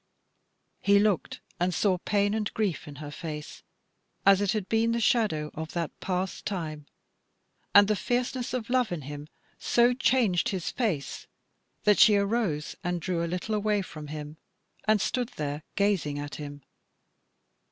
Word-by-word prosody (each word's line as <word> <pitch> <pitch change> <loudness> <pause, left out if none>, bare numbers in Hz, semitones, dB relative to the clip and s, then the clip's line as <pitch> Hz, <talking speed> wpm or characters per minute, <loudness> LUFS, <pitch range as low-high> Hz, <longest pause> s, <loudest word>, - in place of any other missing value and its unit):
He 200 0 +4
looked 205 -3 +1 0.2
and 175 0 +1
saw 190 -3 +2
pain 205 +2 +1
and 215 -1 -1
grief 205 -8 -1
in 145 - -8
her 145 0 -7
face, 150 -1 -7 0.6
as 195 0 +6
it 205 0 +2
had 210 -3 -2
been 225 +1 +2
the 235 - 0
shadow 210 - +1
of 160 +1 -6
that 170 -3 -2
past 185 0 -2
time, 155 -7 -4 0.9
and 205 0 +9
the 215 - +2
fierceness 245 +3 -1
of 245 -1 -4
love 250 -4 +2
in 165 -5 -3
him 145 +2 -7 0.3
so 240 +1 +4
changed 240 -8 +2
his 185 -4 -2
face, 185 - -2 0.6
that 210 -1 +4
she 215 -3 +8
arose 200 -7 0
and 175 -1 -1
drew 170 0 -1
a - - -1
little 210 +5 -1
way 205 -1 +1
from 150 -4 -9
him, 150 +1 -7 0.5
and 215 0 +4
stood 245 +4 -1
there 150 0 -3
gazing 195 -8 +1
at 145 0 -5
him. 145 -1 -8
190 Hz, 160 wpm, -28 LUFS, 155-215 Hz, 0.9 s, and